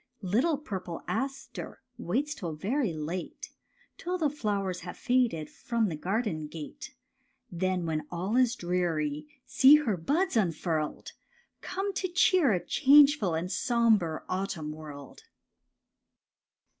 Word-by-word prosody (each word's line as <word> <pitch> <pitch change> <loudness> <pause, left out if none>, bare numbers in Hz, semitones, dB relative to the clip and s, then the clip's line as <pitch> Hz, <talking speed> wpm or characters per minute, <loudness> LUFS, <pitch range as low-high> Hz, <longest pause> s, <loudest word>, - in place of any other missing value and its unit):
Little 245 - +2
purple 185 - -6
aster 270 0 -4 0.2
waits 295 +2 -1
till 170 - -5
very 215 - -1
late, 160 +3 -5 0.5
Till 360 +1 -2
the 305 -5 +1
flowers 200 -9 -2
have 180 +1 -8
faded 240 -11 +1
from 230 -3 -1
the 160 - -3
garden 185 -2 -2
gate; 150 -1 -9 0.6
Then, 185 0 -1
when 155 -2 -2
all 185 +6 -2
is 250 -2 +3
dreary, 160 -5 -1 0.2
see 270 +3 +7
her 250 -11 +1
buds 310 - 0
un 190 -7 +2
furled. 155 -3 -3 0.5
Come 390 +2 -3
to 370 - -1
cheer 355 -5 +4
a 180 -3 -1
changeful 280 - +5
and 175 +3 -3
sombre 215 -7 +2
autumn 185 -5 -3
world. 150 -3 -10
190 Hz, 125 wpm, -29 LUFS, 165-265 Hz, 0.6 s, see